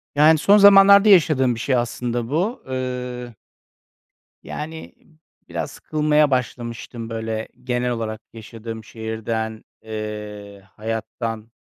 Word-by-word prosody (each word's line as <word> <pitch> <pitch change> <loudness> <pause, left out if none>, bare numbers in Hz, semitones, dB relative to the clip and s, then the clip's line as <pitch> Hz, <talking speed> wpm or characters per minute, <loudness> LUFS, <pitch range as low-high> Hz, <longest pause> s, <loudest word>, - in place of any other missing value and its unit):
Yani, 155 +2 +6
son 200 +7 +5
zamanlarda 200 +1 +8
yaşadığım 150 - +4
bir - - -8
şey 130 +2 0
aslında 120 -1 -2
bu, 185 - -1
ııı 125 -2 -4 1.1
Yani, 160 +1 -7 0.5
biraz - - -4
sıkılmaya 150 -1 +1
başlamıştım, 120 -2 -3
böyle, 110 -1 -4 0.2
genel 125 -1 -1
olarak 110 -2 -4
yaşadığım 115 0 -8
şehirden, 110 0 -4 0.2
eee, 105 -2 -7
hayattan, 115 0 -5
120 Hz, 105 wpm, -22 LUFS, 110-150 Hz, 1.1 s, zamanlarda